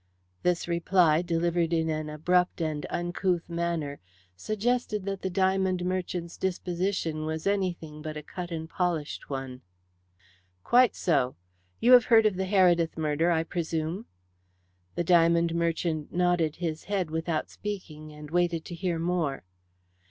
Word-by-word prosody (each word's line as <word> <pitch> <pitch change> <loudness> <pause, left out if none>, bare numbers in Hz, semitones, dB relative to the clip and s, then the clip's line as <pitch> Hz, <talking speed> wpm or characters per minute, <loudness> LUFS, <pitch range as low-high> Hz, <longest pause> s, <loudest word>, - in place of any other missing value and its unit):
This 180 -1 0
reply, 170 -2 +3
delivered 170 -1 0
in 165 -1 +1
an 155 -1 -2
abrupt 180 +5 +1
and 155 -3 -2
uncouth 175 0 -1
manner, 170 -4 -2 0.4
suggested 215 - -1
that 195 -1 -3
the 190 - -2
diamond 190 -1 +1
merchant's 180 -2 -3
disposition 180 -3 -1
was 160 0 -3
anything 175 -6 -1
but 155 0 -5
a 150 - -7
cut 180 +3 -6
and 160 -2 -5
polished 165 -4 -2
one. 135 -2 -5 1.0
"Quite 245 -3 +4
so. 135 -7 +1 0.4
You 245 - +4
have 245 -3 +9
heard 225 -2 +5
of 210 -3 +3
the 190 +1 -2
Heredith 175 -4 +3
murder, 155 +2 +1
I 165 -2 +2
presume." 165 +3 -3 0.9
The - - 0
diamond 170 -1 +4
merchant 165 -2 -1
nodded 175 -3 +1
his 165 -3 -4
head 190 -5 -1
without 160 0 -2
speaking, 155 -7 -7
and 150 0 -11
waited 170 -2 +1
to 175 - -7
hear 170 -1 -2
more. 165 -4 -1
170 Hz, 140 wpm, -28 LUFS, 160-185 Hz, 1.0 s, have